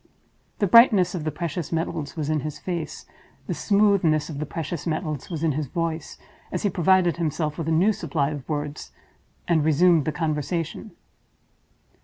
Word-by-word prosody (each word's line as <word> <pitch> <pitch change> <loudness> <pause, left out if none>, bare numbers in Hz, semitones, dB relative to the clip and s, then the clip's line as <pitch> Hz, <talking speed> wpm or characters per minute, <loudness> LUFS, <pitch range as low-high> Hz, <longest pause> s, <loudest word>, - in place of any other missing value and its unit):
The 205 - +1
brightness 200 -4 +6
of 170 -4 -4
the 155 - -1
precious 170 +1 -4
metals 165 -3 -3
was 155 -3 -3
in 155 0 +1
his 150 +1 -5
face, 170 -4 -5 0.4
the - - -2
smoothness 200 -7 +2
of 140 - -6
the 150 - -3
precious 165 +1 -5
metals 155 -4 -3
was 165 -3 -4
in 160 - +2
his 150 0 -2
voice, 165 +1 -3 0.3
as 180 - -3
he 205 - +1
provided 180 0 +3
himself 155 -2 -1
with 160 - -3
a - - +1
new 185 +7 +4
supply 150 -6 -1
of 145 -2 -7
words, 145 -1 -4 0.6
and 165 -3 +3
resumed 160 0 +4
the 155 - 0
conversation. 155 +2 -3
160 Hz, 170 wpm, -24 LUFS, 150-175 Hz, 0.6 s, brightness